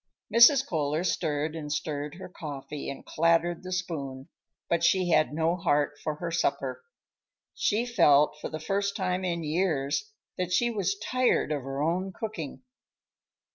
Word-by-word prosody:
Mrs. 250 +4 +7
Kohler 155 - -1
stirred 155 -3 -1
and 150 -2 -5
stirred 150 -1 -3
her 190 - -8
coffee 150 -4 -7
and 140 - -7
clattered 170 +1 +2
the 185 0 -8
spoon, 140 -8 -4 0.4
but 170 0 +1
she 180 +2 +3
had 155 -2 +4
no 160 +3 +1
heart 145 -3 0
for 155 - -2
her 170 +2 -4
supper. 175 - -1 0.7
She 220 +4 +1
felt, 150 -12 +4
for - - -4
the 155 - -5
first 200 +4 -1
time 185 -1 -1
in 170 -2 -1
years, 155 - 0 0.3
that 180 -1 -1
she 240 +6 +2
was 200 -2 -1
tired 250 -4 +1
of 145 -2 -1
her 135 +2 -3
own 180 +4 0
cooking. 210 - -6
165 Hz, 155 wpm, -28 LUFS, 150-185 Hz, 0.7 s, Mrs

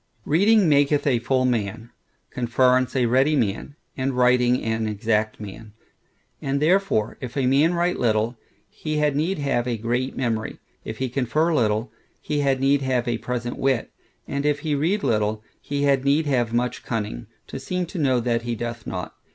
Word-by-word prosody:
Reading 200 +5 +4
maketh 145 -1 +3
a 130 -5 +2
full 130 +2 +1
man; 115 -1 -2 0.4
conference 125 +1 +2
a 125 -2 +2
ready 135 +6 +3
man; 115 +2 -1 0.2
and 130 0 -1
writing 125 0 +4
an 110 0 -1
exact 110 +1 -1
man. 105 +1 -9 0.7
And 140 +1 -1
therefore, 170 - +1
if 125 +1 -6
a 135 - +1
man 145 +7 +3
write 175 +1 0
little, 115 0 +1 0.3
he 155 -1 -4
had 150 -2 +1
need 170 +6 0
have 135 -4 -1
a 120 -2 -1
great 120 +4 -2
memory; 115 -4 -2 0.3
if - - -6
he 130 - -1
confer 140 +6 0
little, 110 -4 +1 0.3
he 150 -1 -2
had 135 -2 +1
need 140 +1 +3
have 130 -2 0
a 120 -1 -1
present 120 -1 -4
wit: 135 -3 0 0.4
and 140 0 -2
if 145 -1 +1
he 155 -1 -1
read 170 +9 0
little, 110 0 0 0.2
he 145 0 -2
had 140 -2 +3
need 145 +3 +2
have 125 -5 +1
much 120 +1 -1
cunning, 105 - -4 0.2
to - - -7
seem 180 +6 -2
to 175 - -7
know, 130 -4 +2
that 120 -1 0
he 120 0 -3
doth 120 0 -5
not. 90 -1 -5
130 Hz, 180 wpm, -23 LUFS, 115-145 Hz, 0.7 s, Reading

